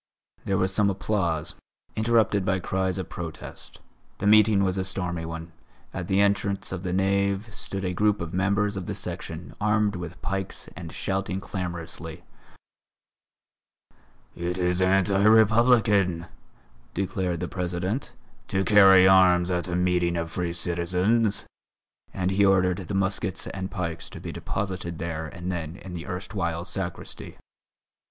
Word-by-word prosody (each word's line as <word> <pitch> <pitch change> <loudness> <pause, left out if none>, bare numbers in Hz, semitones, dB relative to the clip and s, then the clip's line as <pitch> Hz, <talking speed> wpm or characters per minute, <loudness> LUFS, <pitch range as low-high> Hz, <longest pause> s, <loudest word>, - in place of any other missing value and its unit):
There 95 - +1
was 95 +1 0
some 100 +1 +3
applause, 85 -5 -1 0.4
interrupted 110 -3 +2
by 95 0 +1
cries 95 +1 -1
of 95 - -4
protest. 85 -2 -8 0.4
The - - -4
meeting 105 -1 +6
was 95 -1 +1
a - - 0
stormy 90 -3 -2
one; 80 +1 -6 0.4
at 90 -3 -4
the 95 0 +2
entrance 100 -1 +1
of 95 -2 -4
the 90 -2 -3
nave 100 +3 +1
stood 95 -1 -4
a 90 - -1
group 105 +2 +2
of 85 -1 -5
members 100 +2 +1
of 95 -3 -5
the - - -3
Section, 80 +2 -6
armed 105 -1 +2
with 85 -2 -7
pikes 95 0 -3
and 85 -1 -7
shouting 95 +1 -2
clamorously: 85 -3 -6 2.1
"It 85 +1 -3
is 90 0 +1
anti 95 +1 +3
republican," 110 -5 +4 0.7
declared 90 -2 -1
the 90 - -2
President, 90 +7 -3 0.4
"to 95 0 0
carry 95 -2 +7
arms 90 -1 +5
at 90 0 -1
a 90 - -2
meeting 90 -1 +1
of 85 -1 -3
free 85 -1 -2
citizens," 90 +6 +1 0.7
and 95 0 -1
he 100 +1 +3
ordered 95 -2 +3
the 95 +1 -4
muskets 95 -1 -1
and 95 -1 -5
pikes 85 -3 -4
to - - -9
be - - -6
deposited 90 -4 -4
there 80 -1 -4
and 85 +3 -5
then 80 -2 -4
in 95 -1 -9
the 85 -1 -6
erstwhile 90 -2 -3
sacristy. 95 -2 -5
95 Hz, 145 wpm, -26 LUFS, 85-100 Hz, 2.1 s, carry